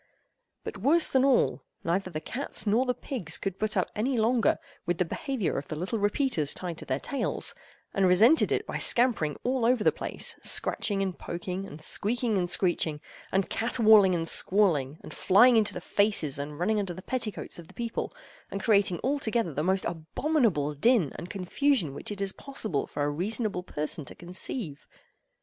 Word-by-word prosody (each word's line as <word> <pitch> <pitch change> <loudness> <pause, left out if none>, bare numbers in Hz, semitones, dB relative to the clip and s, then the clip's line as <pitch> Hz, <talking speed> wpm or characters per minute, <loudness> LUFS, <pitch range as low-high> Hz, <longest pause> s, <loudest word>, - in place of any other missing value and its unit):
But, 205 - -7
worse 305 - +3
than 265 -1 +2
all, 145 - +2 0.2
neither 185 +3 -1
the 155 -4 -4
cats 245 - -2
nor 220 +5 +2
the 250 -1 0
pigs 180 - -4
could 195 -1 -4
put 215 -1 -1
up 185 - 0
any 245 +4 0
longer 230 +1 +2 0.3
with 175 -1 0
the 180 - +1
behavior 245 - -2
of 140 - -10
the 155 - -5
little 185 +8 -3
repeaters 205 - 0
tied 175 -3 -5
to - - -7
their 130 +1 -1
tails, 275 - -2 0.4
and 195 -1 +3
resented 220 - +5
it - - 0
by - - -4
scampering 235 - +3
all 255 -1 0
over 240 -1 +3
the - - +5
place, - - -2
scratching 195 -2 0
and 190 -2 -4
poking, 180 +3 -5
and 155 +2 -10
squeaking 230 +4 0
and 180 -2 0
screeching, 170 -4 +1 0.3
and 195 0 0
caterwauling 220 -5 +4
and 165 -1 -1
squalling, 160 -9 +3
and - - -9
flying 235 +6 +5
into 220 -2 +2
the - - -3
faces, 200 -9 +1
and 145 +1 -5
running 210 +6 +1
under 190 -4 -3
the 185 - -10
petticoats 230 -8 -4
of 165 - -11
the - - -17
people, 235 -2 -3 0.4
and 195 -1 -5
creating 200 -5 +3
altogether 235 - 0
the 150 - -2
most 190 +3 +1
abominable 170 - 0
din 190 - +3
and 175 - -8
confusion 195 - 0
which 140 - -4
it 200 -1 -3
is 195 -1 -1
possible 220 - -3
for 145 - -3
a 145 - 0
reasonable 200 +4 -2
person 155 -3 -4
to 135 - -9
conceive. 175 - -5
195 Hz, 185 wpm, -28 LUFS, 170-235 Hz, 0.4 s, resented